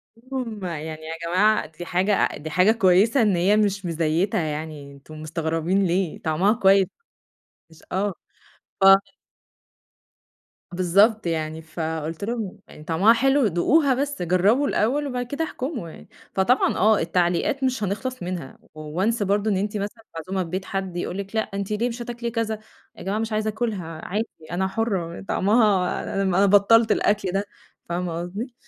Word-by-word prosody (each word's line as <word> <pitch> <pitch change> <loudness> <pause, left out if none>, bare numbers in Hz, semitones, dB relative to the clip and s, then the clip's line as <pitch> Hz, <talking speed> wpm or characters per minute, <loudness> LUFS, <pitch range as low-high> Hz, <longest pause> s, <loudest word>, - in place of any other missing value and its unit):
قُلت 230 +2 -24
لهم 230 -6 -4
يعني 160 -2 -5
يا 165 +1 -5
جماعة 205 +3 +3
دي 160 +3 -10
حاجة 185 +4 +1
أ - - 0
دي 155 - -7
حاجة 185 +6 +4
كويسة 220 +3 +4
إن 210 -4 +3
هي 190 +5 +3
مش 200 -2 0
مزيّتة 165 +3 0
يعني 150 -2 -5
أنتم 150 +3 -12
مستغربين 165 +4 0
ليه، 180 -1 -1
طعمها 170 +7 +2
كويس 195 -3 +4 0.8
مش 160 -1 -19
آه، 195 +2 0 0.7
ف - - +5 1.9
بالضبط 200 +5 +3
يعني، 160 -1 -2
فقُلت 160 +1 -4
لهم: 220 -3 -4 0.3
"طعمها 185 +7 +5
حلو، 270 +2 +3
دوقوها 265 - +3
بس 280 -1 -2
جربوا 190 - +3
الأول 275 +7 +1
وبعد 250 -2 -3
كده 285 +6 -3
احكموا 260 - -5
يعني." - - -14 0.2
فطبعًا 220 +7 +2
آه، 215 0 +4
التعليقات 175 +10 0
مش 255 -4 0
هنخلص 205 +4 -3
منها 175 -6 -5 0.2
Once 185 +9 -1
برضه 205 +2 +1
إن 195 - +1
أنتِ 205 +2 -2
مثلًا 210 +3 -5
معزومة 185 +3 -3
في 165 - -9
بيت 185 +2 -3
حد 190 -2 -4
يقول 180 +1 -3
لك: 200 +2 -6
"لا 220 - +3
أنتِ 200 -1 -5
ليه 225 +4 0
مش 240 0 -6
هتاكلي 235 0 -4
كذا؟" 220 -2 -2 0.4
"يا - - -10
جماعة 200 +3 -1
مش 225 0 -3
عايزة 215 0 0
آكلها، 200 -8 -4
عادي 215 +5 -2 0.2
أنا 190 +2 0
حرة 190 -5 -2
طعمها 200 -3 +2 0.2
أنا 190 +1 +3
بطلت 210 +3 +5
الأكل 205 -3 +1
ده." 195 +2 -1 0.4
فاهمة 175 -1 -2
قصدي؟ 205 +9 -6
195 Hz, 160 wpm, -23 LUFS, 175-220 Hz, 1.9 s, ف